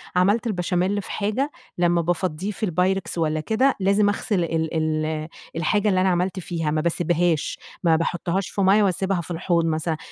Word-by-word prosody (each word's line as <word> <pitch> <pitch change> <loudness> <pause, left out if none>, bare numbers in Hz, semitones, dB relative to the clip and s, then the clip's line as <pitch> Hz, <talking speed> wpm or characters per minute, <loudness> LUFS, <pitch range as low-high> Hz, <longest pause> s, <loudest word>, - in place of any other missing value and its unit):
عملت 200 +6 +3
البشاميل 185 0 0
في - - -9
حاجة 225 +8 -1 0.3
لمّا 175 -1 +3
بافضّيه 175 +2 -1
في 210 - -8
البايركس 185 +1 0
والَّا 155 -1 0
كده، 230 - +2
لازم 200 +2 +3
أغسل 200 -2 0
ال 160 -1 -1
ال 155 -1 -1 0.3
الحاجة 205 +6 +1
اللي 185 -2 +2
أنا 190 - +3
عملت 180 +1 0
فيها، 165 -3 -2
ما 155 0 +1
باسيبهاش، 170 -1 0 0.2
ما 165 -2 +4
باحطهاش 175 +3 -1
في 200 - -2
مَيّة 195 +2 +5
وأسيبها 190 -1 0
في 170 - -9
الحوض 170 0 +1
مثلًا، 160 0 -1
175 Hz, 170 wpm, -23 LUFS, 165-195 Hz, 0.3 s, مَيّة